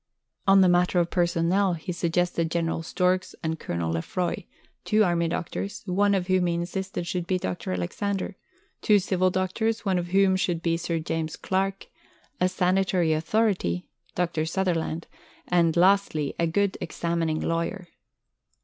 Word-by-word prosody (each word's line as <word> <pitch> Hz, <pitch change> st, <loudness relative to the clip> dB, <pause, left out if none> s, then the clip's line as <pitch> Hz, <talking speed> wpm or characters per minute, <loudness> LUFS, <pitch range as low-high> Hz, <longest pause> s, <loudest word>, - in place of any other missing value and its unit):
On 195 Hz, 0 st, +7 dB
the 185 Hz, -, +6 dB
matter 180 Hz, 0 st, +3 dB
of 170 Hz, 0 st, 0 dB
personnel, 175 Hz, +2 st, +2 dB
he 170 Hz, +3 st, -5 dB
suggested 170 Hz, -1 st, 0 dB
General 165 Hz, -1 st, -1 dB
Storks 180 Hz, +2 st, 0 dB
and 160 Hz, 0 st, -2 dB
Colonel 85 Hz, -1 st, -2 dB
Lefroy; 170 Hz, -, -2 dB, 0.4 s
two 215 Hz, 0 st, +3 dB
army 170 Hz, -3 st, +1 dB
doctors, 200 Hz, +6 st, -4 dB
one 200 Hz, +2 st, +2 dB
of 185 Hz, -2 st, 0 dB
whom 185 Hz, -1 st, +2 dB
he 170 Hz, -, 0 dB
insisted 180 Hz, +1 st, -3 dB
should 175 Hz, 0 st, -3 dB
be 185 Hz, -, +1 dB
Dr. 95 Hz, -, -4 dB
Alexander; 195 Hz, -, -2 dB, 0.5 s
two 210 Hz, -2 st, +5 dB
civil 185 Hz, -1 st, +1 dB
doctors, 220 Hz, +5 st, -1 dB
one 190 Hz, -2 st, +2 dB
of 175 Hz, -, -4 dB
whom 190 Hz, +1 st, +3 dB
should 175 Hz, -2 st, -1 dB
be 165 Hz, -1 st, +2 dB
Sir 170 Hz, 0 st, -2 dB
James 160 Hz, -1 st, -3 dB
Clark; 195 Hz, +1 st, -1 dB, 0.5 s
a 180 Hz, -, +3 dB
sanitary 180 Hz, -2 st, +2 dB
authority, 160 Hz, -, 0 dB, 0.3 s
Dr. 170 Hz, -3 st, 0 dB
Sutherland; 170 Hz, -2 st, -1 dB, 0.4 s
and, 170 Hz, -2 st, +2 dB
lastly, 180 Hz, -5 st, +3 dB
a 170 Hz, -, +2 dB
good 200 Hz, +4 st, 0 dB
examining 165 Hz, -2 st, -1 dB
lawyer. 170 Hz, +3 st, -2 dB
180 Hz, 150 wpm, -26 LUFS, 165-190 Hz, 0.5 s, On